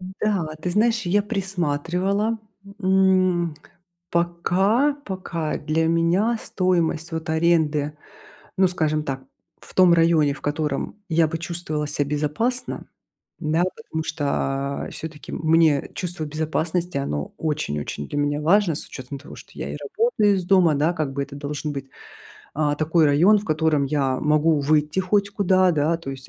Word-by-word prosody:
М-да, 185 -3 -2
ты 180 - -2
знаешь, 225 +3 +2
я 205 +3 +3
присматривала. 195 +2 -1 0.4
М. 185 -3 +3 0.6
Пока, 190 +10 +2
пока 170 -5 -3
для 155 +2 0
меня 170 +8 +2
стоимость, 170 -3 0
вот, 160 0 -3
аренды, 155 -3 +1 0.6
ну 190 -1 +5
скажем 155 -3 0
так, 135 -2 -4 0.4
в - - -16
том 180 -2 +6
районе, 165 -4 +3
в - - -12
котором 150 +3 -2
я 165 -1 +3
бы 165 0 -3
чувствовала 165 -3 -3
ся 145 -1 -1
безопасно. 150 - -2 0.5
Да, 155 +3 +1
потому 160 -8 -5
что, 155 -2 -3 0.6
а, - - -8
всё-таки, 155 -2 -8
мне 160 -3 +2
чувство 175 -3 -4
безопасности, 160 +2 -2
оно 75 - -3
очень-очень 75 - -3
для 145 - -3
меня 145 +1 0
важно 175 +1 +3
с - - -5
учетом 130 +1 -8
того, 145 - -12
что - - -14
я - - -5
и - - -5
работаю 430 - +1
из 180 - -2
дома, 180 -4 +4
да, 155 +5 +2
как 155 -5 -2
бы. 140 +1 -2
Это 140 0 -8
должен 145 +1 -4
быть, 135 -1 -6 0.7
а, 145 -1 +1
такой 160 +2 +2
район, 175 +9 +5
в 205 - -7
котором 155 -2 +1
я 135 -2 0
могу 150 +1 +3
выйти 150 +3 +1
хоть 200 +2 +1
куда, 185 -2 +3
да, 160 +1 +1
то 150 -5 -7
есть. 135 -1 -9
160 Hz, 155 wpm, -23 LUFS, 150-185 Hz, 0.7 s, том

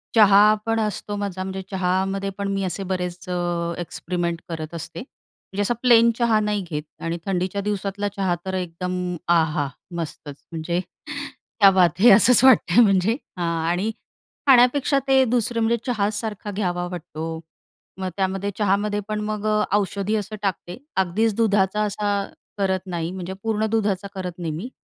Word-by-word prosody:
चहा 210 -1 +7
पण 225 0 +1
असतो 210 -1 -2
माझा 200 -2 -3
म्हणजे 190 0 -5
चहामध्ये 190 +1 0
पण 200 0 -2
मी 195 0 -1
असे 190 +1 -3
बरेच 180 -1 -4
अ, 175 -1 -1
एक्सपेरिमेंट 170 0 -3
करत 160 -1 -5
असते. 165 0 -6
म्हणजे 205 -6 -9
असा 205 +4 +1
प्लेन 235 -2 +6
चहा 235 -3 +3
नाही 210 -1 0
घेत 150 -1 -3 0.2
आणि 165 +1 -2
थंडीच्या 190 +1 -1
दिवसातला 205 0 -2
चहा 190 -3 +1
तर 190 - -3
एकदम 180 0 -3
आहा! 160 -4 +2 0.3
मस्तच. 160 -3 -6 0.2
म्हणजे 165 +2 -2 0.8
क्या 200 -2 +9
बात 180 -3 +3
हे! 235 +5 +7
असंच 225 +5 +7
वाटतं 240 -5 +6
म्हणजे 195 +1 +3 0.2
हां 175 -1 -1 0.2
आणि 185 +6 0 0.6
खाण्यापेक्षा 270 +2 +5
ते 265 -1 +5
दुसरं 235 -1 0
म्हणजे 230 +1 +2
चहासारखा 210 -2 -2
घ्यावा 180 -3 -2
वाटतो. 160 -2 -5 0.6
मग 190 -1 -2
त्यामध्ये 195 +1 -1
चहामध्ये 205 0 +1
पण 215 0 -2
मग 215 0 -3
अ, 215 0 +2
औषधी 200 +1 -1
असं 215 0 -3
टाकते. 180 -3 -3 0.2
अगदीच 200 +4 +1
दुधाचा 210 -2 +2
असा 205 -1 -1 0.3
करत 190 -2 +1
नाही 170 -2 -3
म्हणजे 185 0 -5
पूर्ण 220 -1 0
दुधाचा 205 -3 0
करत 185 -1 -4
नाही 165 -2 -3
मी. 185 +11 -5
195 Hz, 155 wpm, -23 LUFS, 180-210 Hz, 0.8 s, क्या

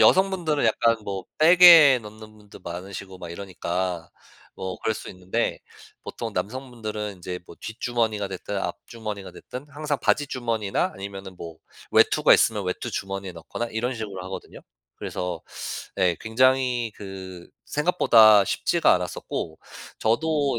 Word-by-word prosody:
여성분들은 180 -7 +3
약간 115 +1 +3
뭐 95 -2 -4
백에 165 -4 +9
넣는 110 0 -12
분도 105 -1 -15
많으시고 95 +2 -7
막 85 -2 -8
이러니까 90 -2 -3 0.5
뭐 95 -1 -5
그럴 110 - 0
수 - - -8
있는데 95 +5 -2 0.4
보통 - - -6
남성분들은 110 -3 -4
인제 90 0 -6
뭐 - - -12
뒷주머니가 110 -2 -1
됐든 95 +1 -5
앞주머니가 100 +3 -5
됐든 130 +3 -9
항상 145 0 -3
바지 145 - +2
주머니나 115 -6 -1
아니면은 95 -1 -8
뭐 85 -2 -9 0.4
외투가 - - +5
있으면 105 -3 +2
외투 90 - -3
주머니에 95 0 -4
넣거나 85 +7 -5
이런 120 +3 -2
식으로 100 -5 -6
하거든요. 95 - -8 0.4
그래서 90 -3 -4 0.5
네. 90 -3 +2
굉장히 125 0 +2
그 95 -3 -9 0.2
생각보다 115 - +5
쉽지가 170 - +2
않았었고 90 -2 -4 0.4
저도 140 +3 +1
105 Hz, 325 characters per minute, -25 LUFS, 95-125 Hz, 0.5 s, 백에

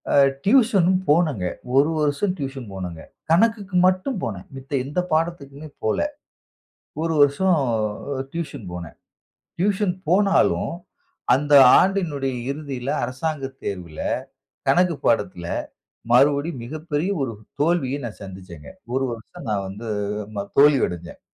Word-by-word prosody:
அ - - +1 0.3
tuition 210 -6 +4 0.2
போனங்க. 150 - +2 0.3
ஒரு 145 +3 +5
வருஷம் 150 +6 +1
tuition 135 -4 -5
போனங்க. 90 -4 -6 0.3
கணக்குக்கு 200 +1 +2
மட்டும் 185 +7 0
போனன். 100 -5 -4
மித்த 135 0 -11
எந்த 145 +6 -2
பாடத்துக்குமே 155 -3 -2 0.2
போல. 110 - +1 1.0
ஒரு 165 0 0
வருஷம் 155 +6 +4 0.8
டியூஷன் 150 -8 -5
போனன். 85 -2 -8 0.6
டியூஷன் 195 0 +1
போனாலும் 195 -1 +3 0.6
அந்த 145 +3 -1 0.3
ஆண்டினுடைய 155 -9 0 0.2
இறுதியில 140 -3 -4
அரசாங்க 135 +2 -3 0.2
தேர்வில 90 -5 -5 0.7
கணக்கு 175 +5 +4
பாடத்தில 100 -6 +1 0.7
மறுபடியும் 140 +3 +3
மிகப்பெரிய 155 +5 -3
ஒரு 130 -4 -2 0.3
தோல்விய 145 -4 +1
நான் 115 -3 -7
சந்திச்சேங்க. 90 -6 -10 0.3
ஒரு 135 +1 +1
வருஷம் 115 +1 -10
நான் 100 -2 -1
வந்து 105 +4 -7 0.5
ம 100 0 -3
தோல்வி 145 -1 +7
அடஞ்சேன் 85 0 -8
145 Hz, 115 wpm, -23 LUFS, 115-170 Hz, 1.0 s, தோல்வி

